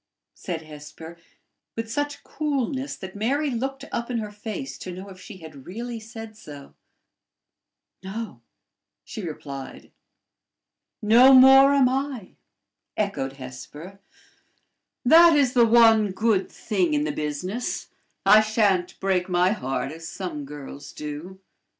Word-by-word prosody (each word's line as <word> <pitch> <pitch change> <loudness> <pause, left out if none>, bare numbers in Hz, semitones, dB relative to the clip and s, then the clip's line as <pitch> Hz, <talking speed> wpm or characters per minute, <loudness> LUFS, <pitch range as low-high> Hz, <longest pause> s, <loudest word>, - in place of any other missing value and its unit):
said 165 -3 -6
Hesper 155 +2 -11 0.6
with 225 0 -4
such 290 +3 -3
coolness 275 -2 -2
that 190 0 -9
Mary 275 +8 0
looked 270 +3 -4
up 235 +1 -3
in 245 - -1
her 210 -2 -4
face 220 +5 -7
to 185 - -7
know 185 +3 -9
if 185 -1 -13
she 200 +1 -11
had 155 -6 -12
really 235 +4 -6
said 225 0 -10
so. 145 -9 -12 1.3
"No," 195 - -7 0.6
she - - -7
replied. 140 -5 -8 1.1
"No 245 +5 +7
more 270 +2 +8
am 270 -2 +5
I," 260 -5 -3 0.6
echoed 200 -11 -2
Hesper; 145 +8 -10 1.1
"that 330 +4 +8
is 265 -3 +2
the 235 -2 +5
one 225 -2 +5
good 215 -2 +1
thing 185 -8 -1
in 145 - +1
the 150 - -1
business: 155 +11 -4 0.4
I 215 - +8
sha'n't 205 -5 +1
break 190 -1 0
my 180 +1 +3
heart, 135 - -3
as 165 +1 -8
some 165 -6 -6
girls 145 0 -10
do. 150 +6 -7
205 Hz, 130 wpm, -24 LUFS, 160-240 Hz, 1.3 s, more